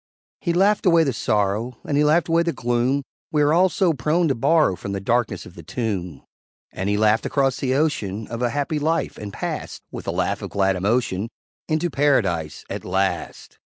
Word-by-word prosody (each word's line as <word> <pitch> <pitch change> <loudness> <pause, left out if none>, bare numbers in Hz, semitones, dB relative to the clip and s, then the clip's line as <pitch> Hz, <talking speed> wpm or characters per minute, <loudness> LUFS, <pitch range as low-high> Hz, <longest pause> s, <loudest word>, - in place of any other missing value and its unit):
He 175 - -1
laughed 195 +3 +3
away 170 -2 +6
the 135 -4 0
sorrow, 105 +3 0
And 145 - -1
he 145 - +4
laughed 155 +3 +3
away 165 0 +3
the 170 0 0
gloom 120 +4 0 0.3
We 150 -1 +3
are 145 +1 +3
all 185 +3 +5
so 180 -3 +2
prone 155 +6 +1
to - - +3
borrow 140 - +3
From 100 +2 -6
the 100 - -2
darkness 110 -1 0
of - - -12
the 85 - -11
tomb; 90 - -4 0.5
And 95 +2 -3
he 105 - +1
laughed 110 +1 +3
across 135 -2 +1
the 130 -1 0
ocean 110 -9 -1
Of 115 +2 -6
a 120 - +2
happy 145 +3 -1
life, 160 +3 -1
and 105 -1 -6
passed, - - -5
With - - -8
a - - +1
laugh - - -1
of - - -5
glad 95 -1 +1
emotion, 105 +1 0 0.4
Into 160 +2 0
Paradise 95 - +1
at - - -5
last. 95 +1 -2
125 Hz, 200 wpm, -22 LUFS, 100-155 Hz, 0.5 s, away